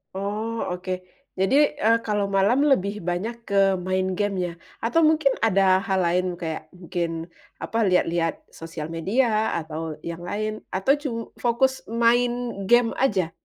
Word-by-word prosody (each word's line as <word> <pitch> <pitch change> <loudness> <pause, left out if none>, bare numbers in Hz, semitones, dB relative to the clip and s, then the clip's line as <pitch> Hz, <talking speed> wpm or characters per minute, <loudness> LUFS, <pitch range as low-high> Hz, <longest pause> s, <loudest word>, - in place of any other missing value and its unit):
Oh, 210 +4 -3
oke. 180 +1 -4 0.5
Jadi, 190 +8 +2 0.2
eee, 225 +2 +4
kalau 205 -2 0
malam 195 +6 +2
lebih 210 -6 +1
banyak 205 +7 -4
ke 200 - -2 0.2
main 185 +1 -1
gim 205 -1 0
ya? 175 - -4 0.3
Atau 240 +9 +2
mungkin 310 -3 +3
ada 195 -3 +4
hal 190 -1 +1
lain, 180 +2 +1
kayak 160 -2 -5
mungkin, 170 -1 -4 0.3
apa, 225 - -3
lihat-lihat 170 -2 +1
sosial 165 -1 -7
media 215 +6 +1
atau 160 -1 -4
yang 170 0 -5
lain 215 +2 -3 0.2
atau 195 +9 +3
cum 275 -6 -4 0.2
fokus 245 +2 +2
main 235 +2 +3 0.4
gim 240 0 +4
aja? 195 -11 +1
195 Hz, 145 wpm, -24 LUFS, 175-230 Hz, 0.5 s, eee